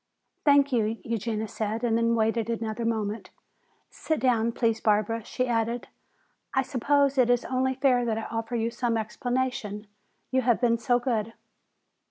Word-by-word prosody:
"Thank 285 -1 +5
you," 225 -1 +1
Eugenia 220 -1 -2
said, 220 +2 -3
and 230 -2 +2
then 230 0 +2
waited 225 0 0
another 230 0 -2
moment. 220 -1 -2 0.6
"Sit 315 - -2
down, 235 -2 +2
please, 225 -1 0
Barbara," 215 +1 +1
she 255 +4 -2
added. 235 0 -1 0.7
"I 265 - +3
suppose 280 +1 +1
it 245 -1 +4
is 245 0 +2
only 260 0 0
fair 255 -2 +3
that 225 -2 0
I 225 - -3
offer 225 +1 -4
you 230 0 0
some 235 -1 -1
explanation. 225 -2 -2 0.5
You 260 0 +2
have 240 -2 +2
been 235 -2 +2
so 245 +1 +2
good." 230 -3 -1
230 Hz, 160 wpm, -27 LUFS, 225-250 Hz, 0.7 s, Thank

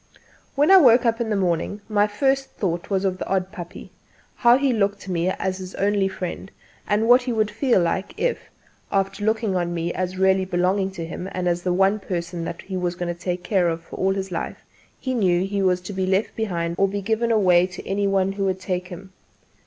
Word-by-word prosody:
When 295 +5 +4
I 385 - +10
woke 250 -7 +6
up 230 0 +1
in 230 - -1
the 210 - +1
morning, 185 +2 -1
my 210 -1 +2
first 270 +5 0
thought 175 -3 -3
was 195 -1 0
of 185 -1 -1
the - - -4
odd 190 -1 -1
puppy 175 -3 -9 0.5
how 240 0 +5
he 270 -2 +1
looked 200 -2 0
to 190 - -7
me 175 +1 0
as 190 0 -2
his 185 0 -8
only 200 -1 +1
friend, 190 0 -5 0.4
and 215 +2 +1
what 245 +2 +7
he 245 0 -3
would 215 -2 0
feel 235 0 +2
like 175 +3 -1
if, - - -2 0.4
after 195 +1 -1
looking 220 -2 0
on 175 -1 -1
me 170 +1 -2
as 185 0 -3
really 190 0 +3
belonging 185 +1 0
to 170 -3 -5
him 180 +3 -6
and 180 -1 -2
as 175 0 0
the 180 - -1
one 195 +3 +3
person 175 -3 -4
that 170 - -6
he 190 - -6
was 180 -1 -1
going 175 0 -3
to 175 - -18
take 180 -1 -3
care 185 -3 +2
of 165 0 -6
all 195 0 0
his 195 -1 -4
life, 165 - -5 0.3
he 260 - -3
knew 185 -6 +2
he 200 0 -2
was 185 -1 +2
to 190 +3 -7
be 190 -1 -1
left 195 +3 0
behind 170 -6 -2
or 195 - +4
given 220 +4 -1
away 180 -5 +4
to 180 -1 -10
any 200 +1 0
one 195 -1 +1
who 195 0 -2
would 190 -1 -1
take 185 -1 -3
him. 190 +1 -10
190 Hz, 225 wpm, -23 LUFS, 180-210 Hz, 0.5 s, I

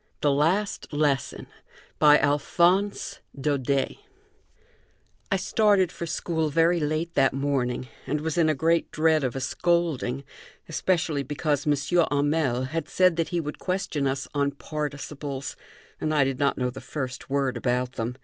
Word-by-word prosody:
THE 145 - +3
LAST 170 +9 0
LESSON 145 -2 0 0.5
BY 150 -1 +7
ALPHONSE 170 +8 +1 0.2
DAUDET 140 -1 0 1.3
I - - +4
started 195 -1 +3
for 170 - -6
school 160 -1 -1
very 165 +3 +3
late 155 +2 -1
that 135 -2 +3
morning 135 -2 -1 0.2
and 150 +1 -1
was 160 0 -2
in 170 -2 +3
great 165 +4 +1
dread 155 -1 +2
of 130 -1 -1
a - - -2
scolding, 145 -3 0 0.4
especially 160 -2 0
because 145 +1 -1
M. 145 - +4 0.3
Hamel 145 -3 +1
had 160 0 -3
said 185 -2 +4
that 165 -2 0
he 175 - -1
would 150 -2 -5
question 185 -7 -1
us 135 0 -2
on 140 -1 +1
participles, 145 -2 -5 0.4
and 155 0 -1
I 145 - +5
did 135 -1 -2
not 140 -1 +2
know 125 -1 -1
the - - -9
first 130 -4 -5
word 135 -1 0
about 125 0 0
them. 125 0 -4
150 Hz, 150 wpm, -26 LUFS, 135-165 Hz, 1.3 s, BY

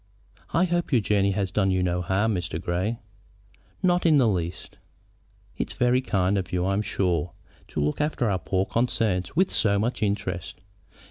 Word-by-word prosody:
"I 165 - +3
hope 175 -2 0
your 125 - +5
journey 100 -2 +2
has 95 -2 -1
done 95 0 +1
you 95 -1 +1
no 90 0 0
harm, 100 +5 +1
Mr. 90 -3 -3
Grey." 90 +8 -1 0.9
"Not 180 -1 +3
in 160 -3 +5
the 130 -4 +4
least." 90 -4 -3 0.8
"It's - - -3
very 125 +1 +3
kind 95 -4 +1
of 90 - -6
you, 90 0 0
I 100 - +1
am 100 - +1
sure, 90 -5 -1 0.3
to - - -5
look 75 - 0
after 150 -5 0
our 95 -3 0
poor 95 0 0
concerns 115 -3 0
with 185 +3 +3
so 100 -2 +2
much 115 +3 -1
interest. 90 -4 -2
100 Hz, 180 wpm, -25 LUFS, 90-120 Hz, 0.9 s, your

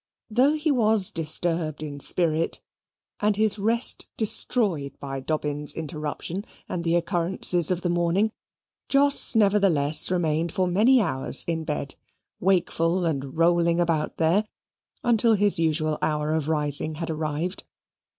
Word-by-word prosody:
Though 260 +7 +3
he 310 0 -1
was 220 -6 +2
disturbed 160 -1 -2
in 145 -2 -7
spirit, 165 +1 +1 0.6
and 210 0 +1
his 215 0 0
rest 230 +4 +1
destroyed 200 - +1
by 135 -1 -6
Dobbin's 150 +1 -1
interruption 160 +4 -5 0.2
and 170 - -4
the 170 0 0
occurrences 175 -1 +1
of 180 -1 -2
the 175 - -1
morning, 175 +5 0 0.6
Jos 280 -2 +5
nevertheless 195 -9 +3
remained 165 -2 -1
for 190 -3 0
many 215 +9 +3
hours 130 -4 0
in 165 -1 -3
bed, 150 -2 -4 0.4
wakeful 175 -1 0
and 140 -3 -4
rolling 170 0 +2
about 165 -3 -1
there 170 +6 +2 0.6
until 230 -1 +3
his 205 -3 +2
usual 155 -1 0
hour 150 0 -1
of 160 -2 -2
rising 150 0 +1
had 165 +1 -4
arrived. 155 +4 -4
170 Hz, 130 wpm, -24 LUFS, 155-200 Hz, 0.6 s, Jos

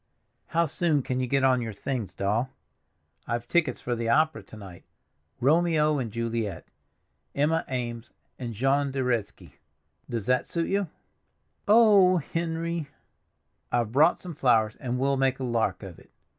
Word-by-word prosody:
"How 170 +1 +1
soon 155 -2 0
can 130 0 -2
you 130 - -1
get 135 +2 +1
on 130 -2 +3
your 115 -2 -4
things, 120 0 -4
Doll? 110 +6 0 0.8
I've 120 0 -3
tickets 170 -3 +1
for 120 - -2
the 115 0 -2
opera 155 -1 +2
to 105 +2 -14
night—'Romeo 145 - -1
and 115 -4 -4
Juliet'—Emma 115 +7 -4
Eames 120 -2 -4 0.3
and 120 -3 -5
Jean 135 +5 +1
de 135 -1 -2
Reszke—does 115 -1 -5
that 125 0 +1
suit 170 -1 -2
you?" 200 -1 0 0.8
"Oh, 205 -4 +6
Henry!" 165 0 -3 0.8
"I've 120 -3 0
brought 155 +7 +4
some 180 -2 -8
flowers, 115 -6 +2
and 125 -2 -3
we'll 135 +1 +1
make 135 -1 +1
a - - -4
lark 110 -6 -1
of 95 -4 -10
it. - - -20
130 Hz, 145 wpm, -27 LUFS, 115-155 Hz, 0.8 s, Oh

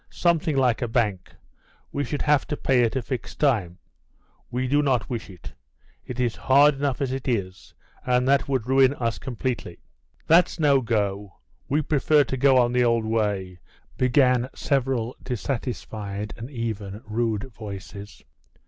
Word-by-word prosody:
"Something 165 -4 +1
like 125 -3 +2
a 120 - 0
bank; 105 -6 -1 0.6
we 140 - -2
should 145 0 -3
have 150 -1 +2
to 150 - -3
pay 130 -2 +2
at 115 - 0
a 130 - -1
fixed 130 -3 -6
time. 105 - +1 0.7
We 125 +1 -2
do 145 +3 +3
not 135 -2 0
wish 115 -4 -4
it; 90 -4 -11 0.5
it 125 0 -6
is 120 -2 0
hard 140 +3 +5
enough 140 -1 -2
as 135 -2 -1
it 135 0 -4
is, 95 -7 -3 0.3
and 125 0 +1
that 140 0 +2
would 130 -5 0
ruin 135 +1 +4
us 115 -4 -2
completely." 125 -8 -4 0.5
"That's 175 +2 +4
no 140 -3 +4
go. 105 -4 -2 0.3
We 150 +3 +1
prefer 150 +1 +3
to 135 - -4
go 130 0 +4
on 120 -1 +3
the 125 0 +2
old 115 -2 +2
way," 100 -5 -1 0.4
began 125 -1 +3
several 130 -3 -1
dissatisfied, 110 -5 -4
and 115 +3 -8
even 110 -5 -5
rude, 115 +2 -2
voices. 100 -1 -9
125 Hz, 155 wpm, -24 LUFS, 110-135 Hz, 0.7 s, hard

